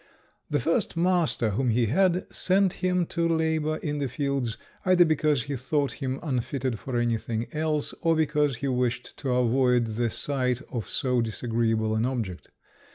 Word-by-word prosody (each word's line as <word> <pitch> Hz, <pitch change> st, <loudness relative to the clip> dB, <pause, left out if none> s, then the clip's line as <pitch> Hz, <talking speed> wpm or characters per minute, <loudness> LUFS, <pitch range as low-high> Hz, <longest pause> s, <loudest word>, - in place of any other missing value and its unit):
The -, -, +1 dB
first 215 Hz, -8 st, 0 dB
master 170 Hz, -10 st, +2 dB
whom 125 Hz, +5 st, 0 dB
he 115 Hz, +1 st, +2 dB
had 180 Hz, -, +2 dB
sent 190 Hz, 0 st, +2 dB
him 180 Hz, -1 st, +2 dB
to 170 Hz, +1 st, -1 dB
labour 160 Hz, -1 st, +1 dB
in 150 Hz, -2 st, -3 dB
the 140 Hz, -, 0 dB
fields, 135 Hz, -3 st, -2 dB, 0.3 s
either 185 Hz, -1 st, +5 dB
because 155 Hz, -4 st, +2 dB
he 140 Hz, +1 st, -4 dB
thought 140 Hz, +2 st, 0 dB
him 130 Hz, 0 st, -2 dB
unfitted 130 Hz, -4 st, -2 dB
for 130 Hz, -3 st, -3 dB
anything 115 Hz, -1 st, -1 dB
else, 155 Hz, -1 st, -1 dB
or 165 Hz, -1 st, +3 dB
because 150 Hz, -3 st, +1 dB
he 140 Hz, +4 st, -3 dB
wished 125 Hz, -1 st, -1 dB
to 140 Hz, -, -4 dB
avoid 125 Hz, 0 st, +3 dB
the 115 Hz, +1 st, -1 dB
sight 130 Hz, +1 st, -1 dB
of 115 Hz, -7 st, -4 dB
so 125 Hz, -2 st, +1 dB
disagreeable 115 Hz, -1 st, 0 dB
an 110 Hz, +2 st, +1 dB
object. 110 Hz, -9 st, -4 dB
135 Hz, 160 wpm, -26 LUFS, 120-155 Hz, 0.3 s, either